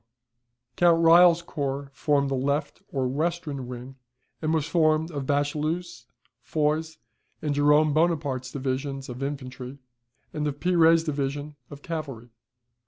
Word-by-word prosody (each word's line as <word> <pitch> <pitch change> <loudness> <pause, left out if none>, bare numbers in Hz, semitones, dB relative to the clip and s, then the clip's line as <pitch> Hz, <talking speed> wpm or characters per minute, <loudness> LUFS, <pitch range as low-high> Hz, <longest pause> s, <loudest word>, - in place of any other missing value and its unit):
Count 170 -1 +5
Reille's 170 0 +7
corps 140 -3 -4
formed 140 -1 +1
the - - +1
left 140 +3 -1
or 130 -2 0
western 145 -2 -2
wing, 125 +2 -8 0.4
and 155 -1 0
was 160 -3 +1
formed 160 0 +2
of 140 -4 -5
Bachelu's, 150 -1 -2 0.3
Foy's, 155 +1 -1 0.4
and 150 -2 -2
Jerome 150 +1 +4
Bonaparte's 145 -6 0
divisions 135 0 -3
of 125 +1 -7
infantry, 135 -1 -5 0.6
and 150 -1 -2
of 145 0 -4
Pire's 165 -2 +4
division 145 -1 -3
of 145 -1 -11
cavalry. 140 -8 -6
145 Hz, 125 wpm, -26 LUFS, 135-160 Hz, 0.6 s, Reille's